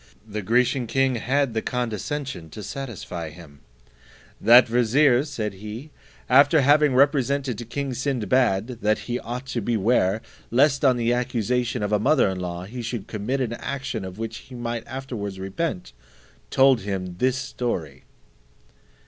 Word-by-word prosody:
The 105 0 -4
Grecian 120 +4 +1
king 135 +1 +1
had 135 +2 0
the 110 - 0
condescension 125 - -3
to 105 +7 -9
satisfy 100 -9 -6
him: 75 -3 -14 0.8
"That 120 +4 +7
vizier," 125 +3 +3
said 115 -9 -4
he, 110 +9 -8 0.4
"after 145 +4 +6
having 145 0 +4
represented 140 -1 +2
to 120 - -6
king 135 +3 -3
Sinbad, 120 -3 0
that 105 +1 +2
he 120 0 -2
ought 125 +3 -6
to 125 -2 -3
beware, 110 -1 +1 0.3
lest 140 +3 +3
on 130 -3 +4
the 120 0 +1
accusation 125 0 -1
of 105 - -2
a 105 - +3
mother 150 +6 +3
in 95 -1 -4
law 90 -1 -4
he 120 +5 -7
should 115 -3 -4
commit 115 +6 -3
an 120 -3 -1
action 135 -4 -4
of 95 0 -7
which 115 0 -5
he 130 - -12
might 120 -1 -4
afterwards 120 -7 -5
repent, 95 - -3 0.6
told 130 - +4
him 95 -3 -4
this 130 0 +2
story." 120 - -4
120 Hz, 150 wpm, -24 LUFS, 105-130 Hz, 0.8 s, That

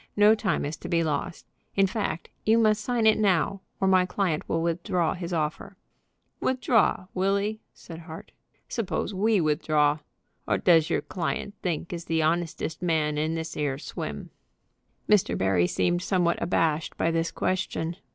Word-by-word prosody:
No 210 +1 +7
time 205 -9 0
is 150 +2 -4
to - - -8
be 165 -1 +2
lost. 155 +2 -3 0.3
In 195 - +4
fact, 195 -4 -3
you 220 +1 +4
must 215 -2 +3
sign 240 -3 0
it 215 0 +5
now, 195 -1 +2 0.2
or 190 - +2
my 185 -1 +4
client 180 -5 0
will 165 0 0
withdraw 170 0 0
from 180 - -9
his 175 -1 -5
offer." 155 -2 -3 0.6
"Withdraw; 245 -7 +2
will 195 +2 +2
'e?" 215 +2 -3
said 165 -1 -11
Hart. 160 -1 -10 0.4
"Suppose 215 -2 -2
we 210 +2 +2
withdraw? 150 -1 +2 0.5
'O - - +2
does 165 -3 +4
your - - +1
client 190 +3 -3
think 170 -1 -3
is 170 -1 -6
the 160 -1 +1
honestest 165 0 -1
man 155 -4 +1
in 155 +2 0
this 165 0 -4
'ere 145 -3 -1
swim?" 150 - -6 0.8
Mr. 210 -3 +3
Barry 95 -2 +2
seemed 175 - 0
somewhat 180 -2 +1
abashed 160 -2 0
by 165 - +1
this 165 0 0
question. 175 -3 -2
170 Hz, 165 wpm, -26 LUFS, 160-195 Hz, 0.8 s, No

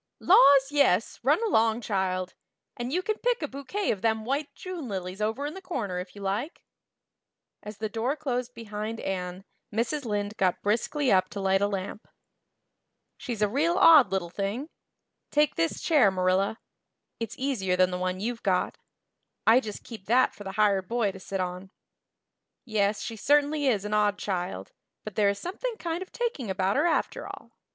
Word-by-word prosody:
"Laws, 275 0 +6
yes, 265 -8 +2
run 295 - +3
along, 230 - +2
child. 185 -4 -1 0.4
And 245 +1 -4
you 360 +4 0
can 430 +2 -2
pick 485 -6 0
a - - -1
bouquet 280 +10 -2
of 195 - -3
them 220 -1 0
white 280 +4 -2
June 360 -7 -6
lilies 190 -1 -5
over 220 +7 -1
in 295 - -4
the 385 - -9
corner 220 - -3
if 180 +2 -8
you 200 - -9
like." 210 - -3 1.0
As 210 0 -9
the 215 - -2
door 225 +6 -1
closed 250 -4 -3
behind 220 0 -5
Anne 185 0 -4 0.3
Mrs. 235 +7 -1
Lynde 205 -2 -2
got 185 -2 +1
briskly 250 +7 +1
up 185 -1 +3
to 205 - -6
light 195 0 +2
a 200 - +3
lamp. 200 +1 -5 1.1
"She's 230 -5 -3
a - - +4
real 300 +10 +1
odd 300 - +7
little 180 -3 -2
thing. 205 - -3 0.6
Take 295 0 +3
this 165 0 -1
chair, 295 - +4
Marilla; 190 +3 +1 0.6
it's 230 -2 -4
easier 230 -9 0
than 185 0 +3
the 180 - -3
one 185 0 -2
you've 235 +3 -3
got; 185 -3 0 0.7
I 230 +3 +7
just 215 -5 -7
keep 220 -5 -10
that 250 +4 +4
for 205 - -10
the 195 -1 -6
hired 200 -2 +2
boy 230 -4 0
to 190 - -11
sit 195 +1 -5
on. 180 +1 -4 1.0
Yes, 210 -2 0
she 230 - -5
certainly 290 +4 +2
is 210 -6 +1
an 210 - -3
odd 210 -1 +2
child, 175 - -4 0.3
but 215 - -7
there 205 +1 +3
is 200 - -1
something 440 - -4
kind 340 -2 -3
of 375 - -8
taking 460 - -3
about 190 +1 0
her 295 +5 +3
after - - -1
all. - - -10
220 Hz, 180 wpm, -27 LUFS, 195-275 Hz, 1.1 s, odd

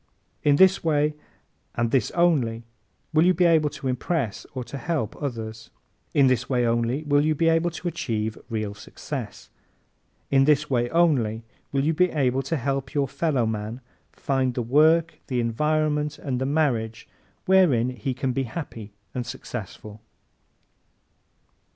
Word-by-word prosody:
In 145 -1 +4
this 190 +4 +5
way 150 -2 +2 0.6
and 120 -1 0
this 130 -6 +2
only 135 -10 +2 0.5
will 155 +1 +5
you 180 +1 +4
be 175 +2 +3
able 160 -3 +4
to 135 - -6
impress 130 - -2
or 130 - -3
to 140 +3 -7
help 150 -11 -2
others. 110 -5 -5 0.5
In 140 - +6
this 125 -1 +1
way 125 -2 +2
only 120 +5 0
will 145 -1 +3
you 155 0 +1
be 165 +3 +1
able 165 +1 +2
to 170 +1 -6
achieve 110 -9 -2
real 110 -3 -3
success. 105 -1 -8 0.8
In 135 -1 +5
this 150 0 +2
way 120 -1 +1
only 125 -10 +2 0.3
will 135 -1 +1
you 160 +3 +2
be 180 +3 +3
able 135 -4 +1
to 135 +5 -2
help 135 +1 -3
your 140 -1 +2
fellowman 115 -7 -1 0.3
find 130 -2 -1
the 125 - -1
work, 155 +6 +3
the 125 -2 -1
environment 150 +5 0
and 130 -3 -3
the 130 - 0
marriage 125 -7 0 0.4
wherein 155 -11 +4
he 125 +2 -4
can 130 -1 -1
be 135 +1 -1
happy 110 -8 -7 0.2
and 125 - -2
successful. 105 -1 -8
135 Hz, 150 wpm, -25 LUFS, 115-155 Hz, 0.8 s, In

